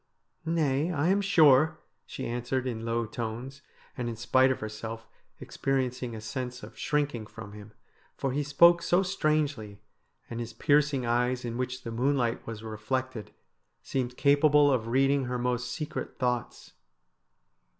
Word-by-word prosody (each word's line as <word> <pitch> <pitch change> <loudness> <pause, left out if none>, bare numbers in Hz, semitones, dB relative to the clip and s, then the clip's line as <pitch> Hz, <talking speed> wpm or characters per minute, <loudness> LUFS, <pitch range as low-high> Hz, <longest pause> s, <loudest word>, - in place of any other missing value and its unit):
' - - -48
Nay, 155 -1 +1
I 160 +1 +1
am 200 +2 +3
sure,' 155 -6 +5 0.3
she - - -6
answered 120 +2 -2
in 115 -3 -3
low 115 0 0
tones, 120 +5 -6 0.3
and, 120 -2 -3
in 115 - -4
spite 130 +3 +3
of 130 - -1
herself, 110 +1 -6 0.3
experiencing 130 -3 -2
a 110 - -7
sense 125 +3 -5
of - - -10
shrinking 145 -7 -1
from 110 -2 -10
him, 105 0 -11 0.5
for 135 - -1
he 145 +3 0
spoke 170 +4 +5
so 180 +2 +2
strangely, 150 - -1 0.5
and 115 - -6
his 115 -1 -5
piercing 145 +1 +2
eyes, 125 +1 0
in 115 -1 -4
which 130 +1 -3
the 115 - -5
moonlight 125 0 0
was 110 -1 -6
reflected, 110 +2 -3 0.5
seemed 125 -2 -3
capable 145 0 +5
of 120 -4 0
reading 135 +2 +2
her 125 0 -2
most 125 0 -1
secret 150 +3 -5
thoughts. 125 -2 -2
125 Hz, 150 wpm, -28 LUFS, 115-145 Hz, 0.5 s, sure